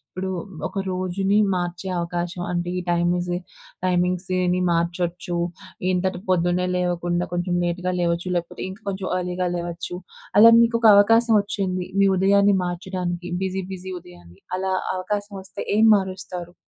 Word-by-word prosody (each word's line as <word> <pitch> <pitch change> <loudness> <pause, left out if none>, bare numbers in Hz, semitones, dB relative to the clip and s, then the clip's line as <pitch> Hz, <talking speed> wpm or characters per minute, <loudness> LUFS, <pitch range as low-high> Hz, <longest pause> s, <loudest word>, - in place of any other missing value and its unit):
ఇప్పుడు 190 +1 -3 0.4
ఒక 195 - -3
రోజుని 185 +2 0 0.2
మార్చే 175 +1 -3
అవకాశం, 175 +1 -3
అంటే 175 0 -2
ఈ - - -3
టైమీజి 175 +1 +1 0.5
టైమింగ్స్‌ 180 0 +1
ఇయన్నీ 180 0 +1
మార్చొచ్చు. 175 +1 -1 0.6
ఇంతటి 185 0 0
పొద్దున్నే 180 0 +2
లేవకుండా 175 0 0
కొంచెం 175 0 -1
లేట్‌గా 180 +1 -1
లేవచ్చు 170 +1 0
లేకపోతే 170 -1 -3
ఇంక 190 +2 -9
కొంచెం 190 -1 -4
అర్లీగా 180 0 -2
లేవచ్చు. 170 0 -4 0.4
అలా 230 +2 +10
మీకొక 230 0 +3
అవకాశం 225 +3 +5
వచ్చింది. 190 -3 -2
మీ 200 - +5
ఉదయాన్ని 200 +1 +4
మార్చడానికి 175 -1 -4
బిజీ, 190 0 -2
బిజీ 185 0 -7
ఉదయాన్ని 85 - -16 0.2
అలా 190 0 -1 0.2
అవకాశం 205 +2 -3
వస్తే 190 - -7
ఏం 220 - +5
మారుస్తారు? 185 -2 -4
180 Hz, 135 wpm, -23 LUFS, 175-190 Hz, 0.6 s, అలా